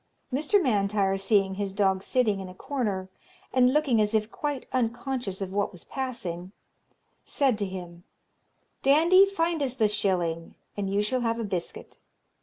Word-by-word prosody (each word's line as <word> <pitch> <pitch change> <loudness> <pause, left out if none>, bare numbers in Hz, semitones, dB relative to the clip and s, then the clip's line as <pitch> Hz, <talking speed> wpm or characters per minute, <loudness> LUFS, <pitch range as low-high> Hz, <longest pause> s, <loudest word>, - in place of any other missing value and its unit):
Mr. 300 +9 +3
M'Intyre 200 - +1
seeing 195 0 +2
his 200 0 -3
dog 190 -1 +1
sitting 215 -2 +1
in 190 -1 -6
a 185 - -11
corner, 210 -7 -2 0.5
and 255 -1 +5
looking 275 -6 +3
as 210 +1 +1
if 215 +1 0
quite 290 -3 -3
unconscious 240 -4 -2
of 190 -1 -4
what 205 0 0
was 180 -4 -12
passing, 195 -9 -5 0.7
said 270 -5 +1
to 200 - 0
him, 175 -2 -8 0.8
'Dandie, 335 +8 +6
find 335 -4 -1
us 260 -3 -1
the 220 -4 +3
shilling, 180 -6 -1 0.2
and 200 -1 -2
you 200 +1 +2
shall 250 +4 0
have 230 0 0
a - - -2
biscuit.' 185 -5 -5
210 Hz, 160 wpm, -27 LUFS, 195-260 Hz, 0.8 s, Dandie